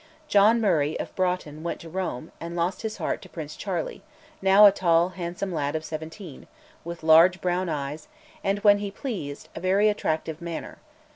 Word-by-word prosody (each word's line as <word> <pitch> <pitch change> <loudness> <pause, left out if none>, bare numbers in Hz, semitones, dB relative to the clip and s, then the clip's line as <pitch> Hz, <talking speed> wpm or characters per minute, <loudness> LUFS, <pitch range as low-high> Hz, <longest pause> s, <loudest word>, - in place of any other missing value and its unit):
John 215 0 +5
Murray 160 -8 +1
of - - -6
Broughton 180 -5 -1
went 170 - -4
to 165 - -10
Rome, 165 -4 -4
and 170 +1 -6
lost 175 +2 -1
his 220 -1 -4
heart - - -2
to 185 - -13
Prince 150 -3 -7
Charles 180 -5 -4 0.4
now 195 +2 +7
a 205 - +9
tall 170 -2 +2
handsome 180 +1 -5
lad 145 -2 -1
of 160 0 -3
seventeen, 160 0 -8 0.4
with 170 -1 -7
large 165 +3 +6
brown 180 0 -1
eyes, 150 0 -4 0.4
and, 195 0 +1
when 205 -1 +6
he 205 0 -3
pleased, 195 - -6
a - - -5
very 195 +4 +3
attractive 160 -5 -2
manner. 170 -1 -6
175 Hz, 180 wpm, -26 LUFS, 160-195 Hz, 0.4 s, a